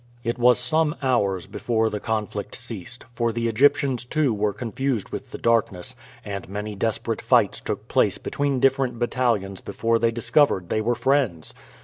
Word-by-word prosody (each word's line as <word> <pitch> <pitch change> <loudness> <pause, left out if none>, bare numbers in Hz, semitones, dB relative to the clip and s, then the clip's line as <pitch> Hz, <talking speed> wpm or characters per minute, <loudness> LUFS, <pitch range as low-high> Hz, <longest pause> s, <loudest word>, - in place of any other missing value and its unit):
It 120 0 -2
was 125 0 +5
some 150 +5 +1
hours 100 -9 +1
before 110 -2 -1
the 105 - -3
conflict 105 -2 -3
ceased, 115 -1 -8
for 115 0 0
the 115 +1 -1
Egyptians 135 +2 +3
too 140 0 +1
were 105 0 0
confused 120 +1 -2
with - - -6
the - - -7
darkness, 110 -6 0 0.3
and 100 -2 -5
many 105 +2 -4
desperate 105 +1 -2
fights - - +3
took - - -4
place - - +2
between 140 -2 -1
different 135 -2 +2
battalions 115 -5 0
before 115 0 0
they 115 - +3
discovered 115 - +2
they 110 - +1
were 120 +2 +1
friends. 120 - 0
115 Hz, 160 wpm, -24 LUFS, 105-130 Hz, 0.3 s, was